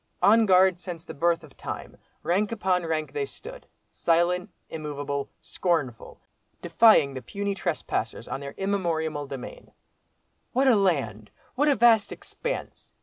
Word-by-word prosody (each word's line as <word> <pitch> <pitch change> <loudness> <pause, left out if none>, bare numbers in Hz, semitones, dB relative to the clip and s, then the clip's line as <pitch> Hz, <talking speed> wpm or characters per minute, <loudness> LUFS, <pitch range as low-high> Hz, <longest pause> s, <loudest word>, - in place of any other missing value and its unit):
On 220 +1 +6
guard 185 -1 +5
since 175 -2 -7
the - - -8
birth 165 +2 +1
of 150 -3 -15
time, - - -7 0.3
rank 200 +5 +1
upon 185 -6 0
rank 155 -1 -2
they 430 - -1
stood—silent, 180 - -2 0.2
immovable, 145 -2 -4
scornful—defying 165 - +1
the 130 - -6
puny 200 +5 -3
trespassers 160 - -3
on - - -4
their 140 0 -8
immemorial 165 -7 -1
demesne. 135 -2 -9 0.8
"What 265 +2 +3
a 250 - +6
land! 135 - 0 0.2
what 290 +4 +1
a 285 - +4
vast 225 -2 +4
expanse!" - - -6
175 Hz, 130 wpm, -26 LUFS, 150-200 Hz, 0.8 s, On